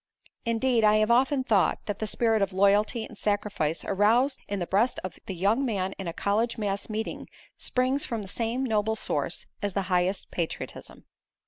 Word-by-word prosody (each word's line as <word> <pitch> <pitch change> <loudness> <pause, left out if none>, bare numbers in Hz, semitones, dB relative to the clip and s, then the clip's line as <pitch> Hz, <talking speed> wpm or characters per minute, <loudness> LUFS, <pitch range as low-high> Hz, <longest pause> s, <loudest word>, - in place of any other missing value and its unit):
Indeed 230 0 +2
I 210 0 +6
have 215 +1 +3
often 260 +3 +3
thought 205 -9 +2
that 205 - -4
the 215 - -2
spirit 225 0 +2
of 195 -1 0
loyalty 205 +4 +3
and - - -12
sacrifice 205 -6 -1
aroused 230 +8 +3
in 200 - -2
the 175 - -2
breast 215 +8 +1
of 185 - -6
the 190 - -4
young 205 +9 +2
man 195 -6 -1
in 190 - -4
a - - -1
college 215 +7 0
mass 200 -1 -2
meeting 220 +1 -4 0.3
springs 260 +3 +1
from 225 -3 -2
the - - -9
same 230 +5 -2
noble 220 -3 +1
source - - -2 0.2
as 205 -2 -1
the 195 - 0
highest 180 +2 0
patriotism. 170 -2 -5
210 Hz, 185 wpm, -27 LUFS, 195-235 Hz, 0.3 s, I